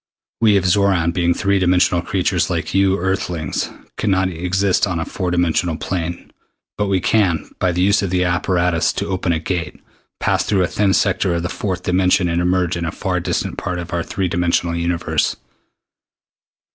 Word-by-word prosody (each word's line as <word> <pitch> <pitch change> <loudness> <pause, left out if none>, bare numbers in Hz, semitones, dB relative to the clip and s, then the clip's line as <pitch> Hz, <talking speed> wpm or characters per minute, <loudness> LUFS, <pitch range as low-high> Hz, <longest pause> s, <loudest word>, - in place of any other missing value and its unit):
We 110 -3 +4
of 95 - 0
Xoran, 90 -3 +2
being 85 -1 +1
three 100 -1 +1
dimensional 90 -1 +3
creatures 90 -1 0
like 85 -3 -2
you 95 0 +3
Earthlings, 90 -4 -2 0.3
can 105 - -1
not 95 -1 +2
even 85 -1 -8
exist 95 +2 +1
on 90 -3 -2
a 80 - -2
four 95 -1 -3
dimensional 85 -1 +1
plane. 85 -1 -4 0.4
But 105 - -1
we 95 -1 +1
can, 90 -4 +1
by 90 - +2
the 90 +1 0
use 100 +2 +3
of 100 -3 -2
apparatus 90 -1 +1
to - - -3
open 95 -2 -1
a 85 - +1
Gate, 85 0 -4 0.4
pass - - +1
through 95 -3 +1
a - - +1
thin 100 0 +1
sector 95 -3 +1
of 85 - -2
the 90 - -2
fourth 95 -3 -3
dimension 90 0 +2
and 85 +1 0
emerge 90 0 +1
in 85 0 -3
a 80 - -2
far 90 0 -2
distant 85 - -2
part 90 - -3
of 85 -1 -6
our 85 - 0
three 95 +2 -2
dimensional 85 -1 0
universe. 85 0 0
90 Hz, 185 wpm, -19 LUFS, 85-95 Hz, 0.4 s, We